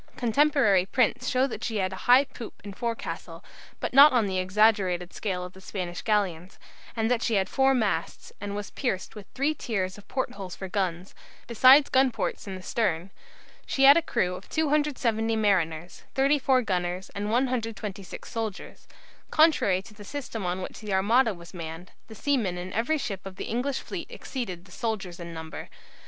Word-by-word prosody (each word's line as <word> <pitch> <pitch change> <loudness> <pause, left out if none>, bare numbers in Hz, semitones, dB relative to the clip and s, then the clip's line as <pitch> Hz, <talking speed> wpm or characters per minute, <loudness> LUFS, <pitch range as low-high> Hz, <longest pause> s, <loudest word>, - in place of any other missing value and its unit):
Contemporary 240 -6 +3
prints 250 +2 +1
show 255 0 +2
that 270 - -6
she 225 -2 -2
had 190 -1 -1
a 190 - -8
high 255 +3 +8
poop 235 -4 -10
and 200 -1 -8
forecastle, 230 +2 -5 0.3
but - - -3
not 285 +3 +9
on 240 -4 +3
the 190 -2 -1
exaggerated 185 -2 +2
scale 185 -4 -3
of 180 - -10
the 190 - -14
Spanish 180 -3 -5
galleons; 195 -5 -1 0.4
and 225 +1 0
that 240 -2 +2
she 230 - +1
had 190 -1 +2
four 270 0 +3
masts, 205 -9 -2
and 205 0 -4
was 205 -2 -5
pierced 220 -9 -3
with 210 -3 -10
three 285 +4 +1
tiers 195 -8 -3
of 205 - -18
port 260 - -2
holes 190 -3 -7
for 190 - -6
guns, 185 -2 -2 0.3
besides 260 +5 +7
gun 265 0 +4
ports 235 - -4
in 190 - -5
the 185 - -9
stern. 185 -5 -1 0.6
She 270 - +1
had 280 +1 +10
a 335 - +4
crew 180 - 0
of 185 +1 -9
270 280 -8 +1
mariners, 175 -6 0
34 270 -2 +3
gunners, 180 -2 -2
and 205 +1 -3
126 225 -5 -2
soldiers. 225 -4 -6 0.4
Contrary 295 - +4
to 210 - -14
the 210 0 -12
system 235 -2 -5
on 180 +1 -2
which - - -7
the 210 -3 -4
Armada 220 +4 +3
was 170 +1 -13
manned, 165 0 -7 0.2
the 220 - -11
seamen 225 -10 0
in 180 +1 -6
every 240 +9 +1
ship 200 -9 -4
of 195 -1 -8
the - - -5
English 255 +4 -1
fleet - - -6
exceeded 190 -10 -6
the 185 - -18
soldiers 195 -5 -4
in 170 -1 -7
number. 160 -1 -8
210 Hz, 185 wpm, -27 LUFS, 185-250 Hz, 0.6 s, had